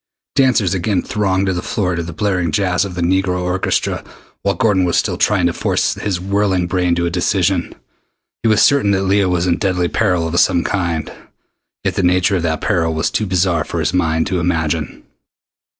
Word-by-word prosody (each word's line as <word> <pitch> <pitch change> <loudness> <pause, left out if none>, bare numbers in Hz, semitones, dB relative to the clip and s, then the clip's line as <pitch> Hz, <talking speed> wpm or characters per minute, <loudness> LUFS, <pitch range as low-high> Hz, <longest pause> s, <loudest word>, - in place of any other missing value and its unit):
Dancers 130 -9 +2
again 95 +1 0
thronged 95 -2 0
the 90 -2 -1
floor 90 -4 -1
to 85 - -2
the 85 0 -6
blaring 90 -1 -1
jazz 90 +2 +1
of 90 -2 -7
the 85 - -2
negro 90 +1 +1
orchestra 90 +1 -1 0.4
while 100 -1 0
Gordon 100 -1 +2
was 85 -1 +1
still - - 0
trying - - +2
to - - +1
force - - 0
his 100 -4 -3
whirling 95 -1 0
brain 90 -1 0
to 85 0 0
a 85 - -1
decision. 90 0 0 0.7
He 115 - +1
was 110 - +4
certain 140 -7 +3
that 95 0 0
Leah 95 0 +2
was 90 -1 0
in 90 -1 +1
deadly 90 -3 0
peril 90 -6 +1
of 85 +1 0
some 85 - +3
kind, 85 -5 -2 0.7
yet - - 0
the - - -1
nature 90 +2 +2
of - - -2
that 80 -1 -1
peril 80 -4 0
was 80 - 0
too 105 - -1
bizarre 90 -3 +1
for - - -4
his - - -1
mind 80 -3 +1
to 95 - -1
imagine. 80 -4 -2
90 Hz, 200 wpm, -17 LUFS, 85-100 Hz, 0.7 s, was